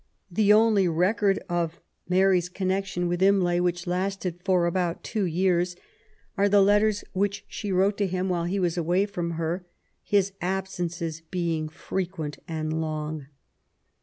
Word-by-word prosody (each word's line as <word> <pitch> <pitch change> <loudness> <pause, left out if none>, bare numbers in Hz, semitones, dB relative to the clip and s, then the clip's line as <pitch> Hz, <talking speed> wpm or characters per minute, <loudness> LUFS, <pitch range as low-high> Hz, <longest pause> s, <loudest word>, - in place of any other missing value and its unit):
The 205 +3 +3
only 210 -3 +5
record 195 +4 +2
of 170 -2 -2 0.3
Mary's 185 -1 +3
connection 190 -1 -1
with 175 +1 -1
Imlay, 190 -3 +4
which 175 0 0
lasted 180 -1 -2
for 185 -3 +3
about 170 0 -1
two 215 -4 -1
years, 175 0 +1 0.6
are 200 -1 +3
the 205 0 +5
letters 210 +1 +3
which 200 +1 -1
she 205 -2 -5
wrote 195 +3 +2
to 200 - +2
him 185 +1 -1
while 175 -2 0
he 185 +3 -1
was 175 -2 0
away 175 +4 +2
from 175 -4 -3
her, 165 +3 -2 0.4
his 200 -2 +1
ab 190 +1 -1
sences 170 -3 -4
being 165 -4 -1
frequent 170 -2 -4
and 155 0 -2
long. 155 -2 -4
180 Hz, 150 wpm, -26 LUFS, 170-195 Hz, 0.6 s, only